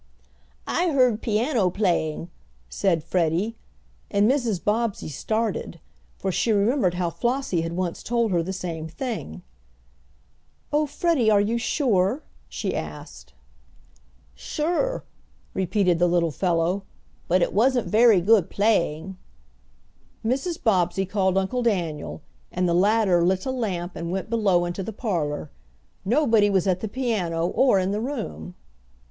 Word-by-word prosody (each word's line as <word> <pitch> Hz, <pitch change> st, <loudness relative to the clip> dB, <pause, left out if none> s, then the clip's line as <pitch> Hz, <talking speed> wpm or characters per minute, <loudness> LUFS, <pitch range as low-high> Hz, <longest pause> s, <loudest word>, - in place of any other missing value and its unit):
"I 350 Hz, 0 st, 0 dB
heard 255 Hz, -7 st, +3 dB
piano 225 Hz, -2 st, +1 dB
playing," 175 Hz, -4 st, -1 dB, 0.4 s
said 170 Hz, -6 st, 0 dB
Freddie, 180 Hz, +7 st, 0 dB, 0.5 s
and 205 Hz, 0 st, +3 dB
Mrs. 240 Hz, -7 st, +1 dB
Bobbsey 215 Hz, -4 st, -1 dB
started, 215 Hz, -, -2 dB, 0.4 s
for 190 Hz, -, -2 dB
she 225 Hz, -, +1 dB
remembered 205 Hz, -2 st, +2 dB
how 175 Hz, -1 st, -1 dB
Flossie 240 Hz, 0 st, -1 dB
had 165 Hz, 0 st, -4 dB
once 175 Hz, -1 st, -3 dB
told 235 Hz, -2 st, 0 dB
her 175 Hz, -2 st, +2 dB
the 180 Hz, +3 st, -4 dB
same 170 Hz, -4 st, -5 dB
thing. 160 Hz, -, -5 dB, 1.3 s
"Oh, 300 Hz, 0 st, +2 dB
Freddie, 295 Hz, -5 st, +1 dB
are 210 Hz, -2 st, +5 dB
you 220 Hz, +4 st, 0 dB
sure?" 235 Hz, -1 st, +1 dB, 0.3 s
she -, -, -3 dB
asked. -, -, -8 dB, 1.0 s
"Sure," 350 Hz, +11 st, -2 dB, 0.5 s
repeated 185 Hz, -2 st, +1 dB
the 175 Hz, -, +4 dB
little 170 Hz, -2 st, +1 dB
fellow. 175 Hz, +3 st, 0 dB, 0.5 s
"But 180 Hz, 0 st, +3 dB
it -, -, -1 dB
wasn't 245 Hz, +3 st, +2 dB
very 220 Hz, -3 st, +5 dB
good 205 Hz, -1 st, +4 dB
playing." 190 Hz, -4 st, 0 dB, 1.1 s
Mrs. 275 Hz, +9 st, -1 dB
Bobbsey 190 Hz, -2 st, +2 dB
called 190 Hz, -1 st, +1 dB
Uncle 195 Hz, +6 st, 0 dB
Daniel, 170 Hz, -9 st, -2 dB, 0.3 s
and 180 Hz, 0 st, 0 dB
the 170 Hz, -, +1 dB
latter 190 Hz, -1 st, +3 dB
lit 185 Hz, +1 st, +1 dB
a 260 Hz, -, -1 dB
lamp 190 Hz, -8 st, -3 dB
and 170 Hz, 0 st, -4 dB
went 190 Hz, +5 st, -4 dB
below 195 Hz, -6 st, +2 dB
into 175 Hz, +2 st, -4 dB
the 215 Hz, +4 st, -5 dB
parlor. 155 Hz, -, -2 dB, 0.5 s
Nobody 225 Hz, -2 st, +3 dB
was 190 Hz, -3 st, +2 dB
at 185 Hz, -2 st, +1 dB
the 220 Hz, -, -3 dB
piano 200 Hz, -9 st, -1 dB
or 260 Hz, -6 st, +3 dB
in 190 Hz, 0 st, 0 dB
the 210 Hz, +1 st, -1 dB
room. 235 Hz, -8 st, -5 dB
195 Hz, 135 wpm, -24 LUFS, 175-230 Hz, 1.3 s, are